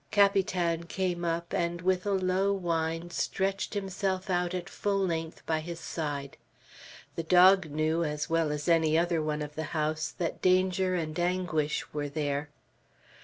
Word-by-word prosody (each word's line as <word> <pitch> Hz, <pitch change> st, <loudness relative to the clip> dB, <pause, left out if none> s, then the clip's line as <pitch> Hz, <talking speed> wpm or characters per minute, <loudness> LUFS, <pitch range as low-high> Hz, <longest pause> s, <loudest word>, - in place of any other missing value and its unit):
Capitan 185 Hz, -4 st, +2 dB
came 175 Hz, 0 st, -2 dB
up, 170 Hz, 0 st, -2 dB
and 170 Hz, 0 st, -1 dB
with 185 Hz, +1 st, +1 dB
a -, -, +1 dB
low 190 Hz, +1 st, +2 dB
whine 165 Hz, -2 st, -2 dB
stretched 195 Hz, +4 st, -1 dB
himself 195 Hz, -1 st, -2 dB
out 180 Hz, 0 st, 0 dB
at 180 Hz, 0 st, -4 dB
full 200 Hz, 0 st, -1 dB
length 165 Hz, -4 st, -2 dB
by 160 Hz, -1 st, 0 dB
his 170 Hz, +1 st, -6 dB
side. 145 Hz, -4 st, -4 dB, 0.8 s
The -, -, -1 dB
dog 180 Hz, +1 st, +6 dB
knew 155 Hz, +3 st, 0 dB
as 150 Hz, -1 st, -2 dB
well 165 Hz, -2 st, +1 dB
as 150 Hz, +1 st, -3 dB
any 160 Hz, -2 st, +4 dB
other 170 Hz, -1 st, +1 dB
one 150 Hz, -1 st, -2 dB
of 150 Hz, 0 st, -7 dB
the 155 Hz, -, -4 dB, 0.2 s
house 155 Hz, +1 st, 0 dB
that 170 Hz, -2 st, -3 dB
danger 185 Hz, 0 st, +3 dB
and 160 Hz, -2 st, -3 dB
anguish 175 Hz, -4 st, -1 dB
were 145 Hz, -1 st, -2 dB
there. 145 Hz, 0 st, -2 dB
170 Hz, 160 wpm, -29 LUFS, 155-185 Hz, 0.8 s, dog